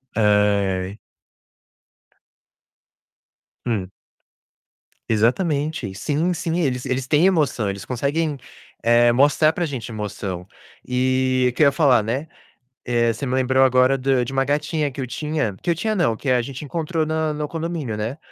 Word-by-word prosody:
Ai. 100 -2 +1 2.7
Hum. 95 -5 -2 1.2
Exatamente. 140 - 0
Sim, 155 - -1
sim, 170 0 -2
eles 125 -5 -1
eles 130 0 -1
têm 150 +6 +3
emoção, 145 - +1
eles 100 0 -6
conseguem, 145 +4 -1 0.4
eh, 120 +1 +5
mostrar 145 +5 +4
pra 175 - -2
gente 125 -6 -5
emoção. 100 -4 -5 0.4
E 130 0 +1
o - - -16
que - - -1
eu - - +7
ia - - +4
falar, 135 -6 +4
né, 130 +9 -3 0.6
eh, 120 -1 +2
você 125 +5 -6
me 130 -1 -2
lembrou 130 0 +3
agora 130 +1 +4
do 130 -1 +1
de 135 - -7
uma 135 - +2
gatinha 150 +1 -1
que 135 - -7
eu 130 - -3
tinha 150 -6 -2
que 175 - 0
eu - - +3
tinha 215 +6 -1
não, 175 - +2
que 135 - -7
a 125 -1 +3
gente 135 +3 -7
encontrou 160 +1 -2
no 155 -1 -1
no 150 0 -4
condomínio, 165 -8 -4
né. 115 +8 -4
130 Hz, 155 wpm, -22 LUFS, 115-155 Hz, 2.7 s, eu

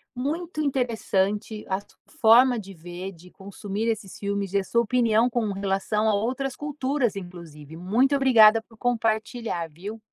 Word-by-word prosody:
muito 310 +5 -3
interessante 220 -6 -1
a 190 0 -1
su 200 - -22 0.2
forma 240 +2 +6
de 195 -2 -10
ver, 175 +3 -7
de 180 +1 -17
consumir 200 +2 -5
esses 215 -4 -3
filmes, 200 -1 -3
e 200 - +3
a - - -3
sua 235 +4 +1
opinião 235 -1 +2
com 225 -3 -1
relação 195 +2 -1
a - - +2
outras 250 +6 -2
culturas, 280 -5 -2
inclusive. 170 -5 -10
Muito 225 - +1
obrigada 225 -5 +6
por 225 0 -22
compartilhar, 225 -5 -1
viu. 200 +8 -8
220 Hz, 155 wpm, -25 LUFS, 195-245 Hz, 0.2 s, forma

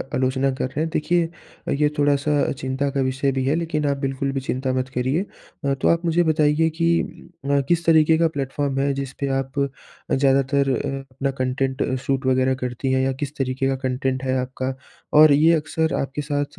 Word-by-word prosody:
आलोचना 130 +1 +1
कर 130 - -2
रहे 140 - -6
हैं। 160 - -1
देखिए, 170 +1 +1 0.5
ये 150 +1 +2
थोड़ा 145 -1 +3
सा 145 +1 +1
चिंता 130 +1 -1
का 135 -1 -1
विषय 135 +1 0
भी 130 0 -1
है 140 - +2
लेकिन 160 -3 -1
आप 140 - 0
बिल्कुल 135 0 -2
भी 135 - -2
चिंता 130 0 -2
मत 130 0 -1
करिए। 130 +8 +1 0.4
अ, 140 - +2
तो 135 - -1
आप 170 +1 +2
मुझे 170 +1 +3
बताइए 155 0 +2
कि 170 +1 +1 0.5
अ, 140 0 +2
किस 170 -1 +1
तरीके 160 -1 +5
का 165 - +3
प्लेटफॉर्म 140 -2 -2
है 140 0 +1
जिस 135 -1 -5
पे 140 - -1
आप 135 +1 -4 0.5
ज़्यादातर 135 0 +2
अ, 135 +1 -1 0.2
अपना 135 0 -1
कंटेंट 130 +1 -1 0.2
शूट 135 -1 -1
वगैरह 130 0 +2
करती 125 +2 -2
हैं 130 0 +2
या 135 - +1
किस 145 +2 -5
तरीके 135 0 -1
का 135 - +1
कंटेंट 130 0 -1
है 130 0 0
आपका 130 +1 -4 0.4
और 155 0 +8
ये 155 +4 +5
अक्सर 160 0 0
आपके 135 +2 -4
साथ 145 0 -1
140 Hz, 200 wpm, -22 LUFS, 130-150 Hz, 0.5 s, और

